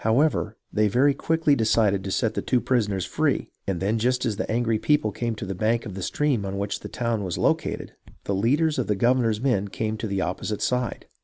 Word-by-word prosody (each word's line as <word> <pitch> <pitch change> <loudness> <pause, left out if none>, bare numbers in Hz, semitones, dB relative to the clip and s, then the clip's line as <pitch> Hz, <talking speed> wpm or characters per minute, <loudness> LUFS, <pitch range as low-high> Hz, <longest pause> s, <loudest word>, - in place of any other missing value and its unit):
However, 110 -2 +2 0.2
they 105 0 +3
very 130 +7 +3
quickly 160 -1 +2
decided 110 -4 +2
to 95 - -4
set 110 +3 0
the - - -2
two 125 - +1
prisoners 105 -8 0
free, - - 0 0.2
and 95 -3 -1
then 105 +5 0
just 125 +3 +1
as 110 -3 0
the 105 - -4
angry 115 -1 +1
people 150 -6 +2
came 115 +2 -2
to 105 - -6
the 95 - -3
bank 110 +5 0
of 105 - -6
the 95 - -6
stream 135 +1 0
on 100 0 -4
which 100 0 -2
the - - -8
town 115 -3 -1
was 90 -3 -3
located, - - 0 0.3
the 100 - -2
leaders 145 +10 +2
of 125 - -1
the 105 - +1
governor's 115 0 +2
men 115 -6 +1
came 110 +2 -3
to 110 - -3
the 100 -1 -2
opposite 100 +4 -3
side. 125 -3 -1
110 Hz, 225 wpm, -25 LUFS, 100-125 Hz, 0.3 s, they